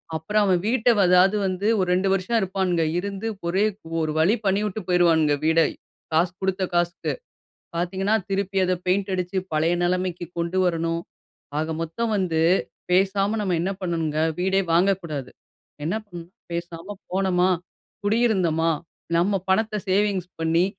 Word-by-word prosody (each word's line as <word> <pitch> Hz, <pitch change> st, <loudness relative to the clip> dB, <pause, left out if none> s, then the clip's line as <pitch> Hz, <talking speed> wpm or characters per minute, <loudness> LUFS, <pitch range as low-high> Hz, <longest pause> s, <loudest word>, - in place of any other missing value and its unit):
அப்புறம் 205 Hz, +7 st, +1 dB
அவன் 185 Hz, -2 st, +3 dB
வீட்டை, 240 Hz, 0 st, +3 dB, 0.2 s
அதாவது 180 Hz, +3 st, +5 dB
வந்து 185 Hz, +2 st, -1 dB
ஒரு 185 Hz, -, +1 dB
2 185 Hz, +2 st, +1 dB
வருஷம் 195 Hz, +5 st, 0 dB
இருப்பானுங்க. 185 Hz, -3 st, 0 dB, 0.2 s
இருந்து 200 Hz, +3 st, -4 dB, 0.2 s
ஒரே 190 Hz, +4 st, +2 dB, 0.4 s
ஒரு 155 Hz, -, -1 dB
வழி 185 Hz, +9 st, +4 dB
பண்ணிவிட்டு 205 Hz, +1 st, 0 dB
போயிருவானுங்க 165 Hz, -4 st, +4 dB
வீட, 160 Hz, +1 st, +4 dB, 0.5 s
காசு 170 Hz, +3 st, +3 dB
குடுத்த 190 Hz, 0 st, 0 dB
காசுக்கு. 175 Hz, 0 st, 0 dB, 0.6 s
பாத்தீங்கன்னா, 190 Hz, +4 st, 0 dB
திருப்பி 195 Hz, 0 st, -1 dB
அதை 185 Hz, 0 st, +1 dB
பெயிண்ட் 195 Hz, +2 st, +1 dB
அடிச்சு 180 Hz, +1 st, -2 dB
பழைய 155 Hz, +2 st, +2 dB
நிலைமைக்கு 180 Hz, -1 st, -1 dB
கொண்டு 170 Hz, +2 st, -1 dB
வரணும். 165 Hz, -1 st, 0 dB, 0.6 s
ஆக 155 Hz, +1 st, -1 dB
மொத்தம் 220 Hz, +8 st, -2 dB
வந்து 175 Hz, -5 st, 0 dB, 0.5 s
பேசாம 195 Hz, +3 st, +2 dB
நம்ம, 190 Hz, -4 st, 0 dB
என்ன 190 Hz, +3 st, -1 dB
பண்ணணுங்க 165 Hz, -4 st, -1 dB, 0.2 s
வீடே 190 Hz, +2 st, +2 dB
வாங்கக்கூடாது. 170 Hz, -7 st, +1 dB, 0.5 s
என்ன 170 Hz, -, -1 dB
பண்ணோம் 175 Hz, -4 st, -10 dB, 0.2 s
பேசாம 170 Hz, +3 st, -5 dB, 0.2 s
போனமா, 185 Hz, -1 st, +2 dB, 0.5 s
குடியிருந்தமா, 190 Hz, -7 st, +2 dB, 0.5 s
நம்ம 195 Hz, +4 st, +2 dB
பணத்தை 215 Hz, +2 st, +1 dB
சேவிங்ஸ் 195 Hz, -2 st, +1 dB
பண்ணி, 165 Hz, +2 st, +3 dB
185 Hz, 135 wpm, -24 LUFS, 170-195 Hz, 0.6 s, அதாவது